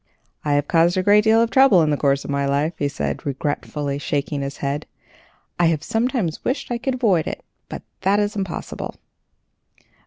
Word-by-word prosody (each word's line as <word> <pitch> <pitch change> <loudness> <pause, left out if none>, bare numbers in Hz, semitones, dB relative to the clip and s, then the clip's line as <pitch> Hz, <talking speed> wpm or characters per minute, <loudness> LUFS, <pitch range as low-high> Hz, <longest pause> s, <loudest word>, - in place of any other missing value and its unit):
"I 145 - 0
have 145 0 +1
caused 170 +2 +3
a 185 - +1
great 205 +2 +5
deal 225 +1 +5
of 230 - -2
trouble 265 -11 +6
in 155 - +1
the - - +2
course 140 -1 +1
of - - -4
my 140 0 0
life," 145 +4 0
he 145 - +1
said, 75 - -3
regretfully, 145 0 -3
shaking 145 0 -2
his 140 +1 -5
head. 140 +2 -3 0.7
"I 175 - +5
have 160 -3 0
sometimes 225 - -1
wished 255 -1 -2
I 240 - -1
could 255 +1 -1
avoid 200 -10 +2
it, - - -6 0.2
but - - -7 0.2
that 200 +2 +2
is 205 0 -1
impossible. 190 -4 -5
160 Hz, 190 wpm, -21 LUFS, 145-210 Hz, 0.7 s, trouble